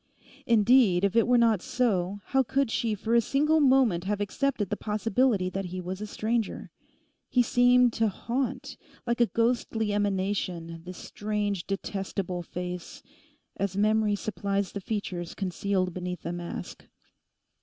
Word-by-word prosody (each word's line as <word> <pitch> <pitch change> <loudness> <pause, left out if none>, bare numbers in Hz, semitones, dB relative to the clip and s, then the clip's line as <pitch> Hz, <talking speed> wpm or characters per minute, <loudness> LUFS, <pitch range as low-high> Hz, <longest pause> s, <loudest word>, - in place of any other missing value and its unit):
Indeed, 220 -4 +5
if 200 +1 +1
it 230 - +4
were 245 0 +5
not 225 -5 +3
so, 200 -6 0
how 270 -1 +2
could 265 -1 0
she 225 -2 0
for 220 +3 -2
a 235 - +6
single 300 +7 +2
moment 255 - +3
have 205 +1 -1
accepted 205 0 -1
the - - +1
possibility 215 -1 +1
that 195 0 -3
he 180 +1 -5
was 185 +2 -5
a 210 - -4
stranger? 220 +1 -2 0.6
He 245 - +3
seemed 245 0 +4
to 225 0 +2
haunt, 245 +6 -3 0.3
like 235 0 0
a 235 - +5
ghostly 230 -2 0
emanation, 185 -4 -2
this 180 0 -8
strange, 205 -3 -3
detestable 195 -2 -3
face—as 180 +2 -7
memory 215 0 +2
supplies 200 -2 -2
the 200 - -5
features 185 -4 -4
concealed 190 -1 -1
beneath 180 -2 -5
a 170 - -2
mask. 175 0 -7
205 Hz, 145 wpm, -27 LUFS, 185-235 Hz, 0.6 s, a